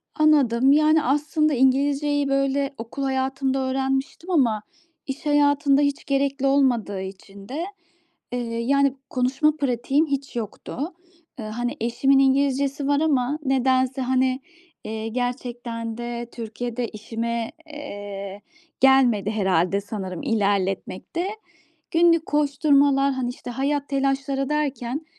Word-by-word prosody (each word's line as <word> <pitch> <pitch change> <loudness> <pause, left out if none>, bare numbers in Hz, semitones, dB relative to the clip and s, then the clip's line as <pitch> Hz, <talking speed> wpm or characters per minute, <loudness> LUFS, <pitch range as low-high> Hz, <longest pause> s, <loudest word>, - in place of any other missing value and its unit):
Anladım. 275 -5 +4
Yani 305 +1 +4
aslında 300 +2 +1
İngilizce'yi, 280 +2 +2
böyle, 275 +1 0
okul 230 +5 -6
hayatımda 265 0 0
öğrenmiştim 270 +5 -2
ama 235 -10 +2 0.5
iş 270 +2 -6
hayatında 290 -1 +3
hiç 285 -1 0
gerekli 275 -1 0
olmadığı 245 -8 +2
için 195 +2 -10
de, 320 +6 -3 0.7
eee, 245 - -2 0.2
yani 275 +2 +2
konuşma 265 +5 +1
pratiğim 270 +2 +1
hiç 275 -2 -3
yoktu. 225 0 -6 0.6
Iıı, 215 - -5
hani 240 +4 -3
eşimin 270 +4 +3
İngilizcesi 275 +1 +2
var 285 0 +3
ama 290 -2 +1
nedense, 260 0 +2
hani, 260 +1 +1 0.5
iii, 220 0 -4
gerçekten 240 -2 -4
de 240 0 -5
Türkiye'de 235 +1 -4
işime, 230 +1 -4 0.2
eee, 205 -9 -7 0.4
gelmedi 245 -7 +4
herhâlde 190 -2 +1
sanırım, 190 -4 -6
ilerletmek 200 - -1
de. 350 +3 0 0.6
Günlük 335 -1 +4
koşturmalar, 280 -1 +3
hani, 255 -2 -2
işte, 245 0 -7
hayat 280 +3 -1
telaşları 275 0 0
derken 290 -1 -2
265 Hz, 115 wpm, -23 LUFS, 235-280 Hz, 0.7 s, Anladım